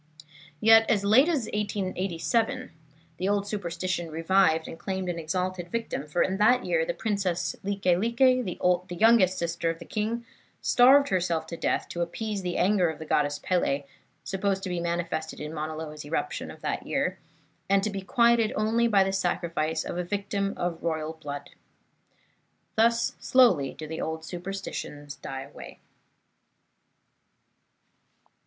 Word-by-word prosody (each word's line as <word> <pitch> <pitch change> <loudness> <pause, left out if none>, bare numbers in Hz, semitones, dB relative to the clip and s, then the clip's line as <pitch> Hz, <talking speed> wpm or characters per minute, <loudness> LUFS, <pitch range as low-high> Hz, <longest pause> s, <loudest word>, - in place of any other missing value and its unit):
Yet 225 +2 +6
as 205 -3 +2
late 255 +10 +6
as 290 -9 0
1887 205 +4 -1 0.5
the 185 - -1
old 205 0 +1
superstition 185 -3 -3
revived 165 0 +2
and 165 - -9
claimed 190 -2 -3
an 170 -1 -3
exalted 180 +2 -3
victim, 225 -9 -3
for 150 +4 +1
in 190 +1 -1
that 235 +5 +4
year - - +2
the - - -3
Princess 190 -5 -1
Like 200 0 -4
Like, 200 +7 +2
the 185 -8 +2
youngest 215 -4 +5
sister 170 0 -1
of 165 - -2
the 170 - -11
king, 225 +5 -2 0.3
starved 275 +3 +5
herself 170 -4 0
to 170 - -6
death - - -1
to 175 - -4
appease 205 +4 -3
the 180 -1 -3
anger 185 -2 +3
of 160 - -5
the 160 - -8
Goddess 145 -1 +1
Pele, 145 -6 +1 0.4
supposed 195 0 -1
to 190 - -3
be 175 -1 -2
manifested 170 -2 -3
in 150 +1 -6
Mauna 155 0 -4
Loa's 155 -1 -7
eruption 150 +3 -3
of - - -11
that - - -3
year, - - -1 0.5
and 195 0 +3
to 215 - -1
be 195 -1 -4
quieted 235 +2 +3
only 225 +2 +2
by 200 -4 +4
the 190 0 -2
sacrifice 170 -4 -1
of 175 - -4
a - - 0
victim 200 +1 -2
of 175 -2 -2
royal 160 -1 -2
blood. 145 -3 -7 1.2
Thus 230 +1 +3
slowly 225 - +4
do 155 - -7
the 160 +1 -5
old 160 0 -4
superstitions 175 -5 -6
die 135 0 -6
away. 140 - -11
185 Hz, 155 wpm, -27 LUFS, 165-210 Hz, 1.2 s, Yet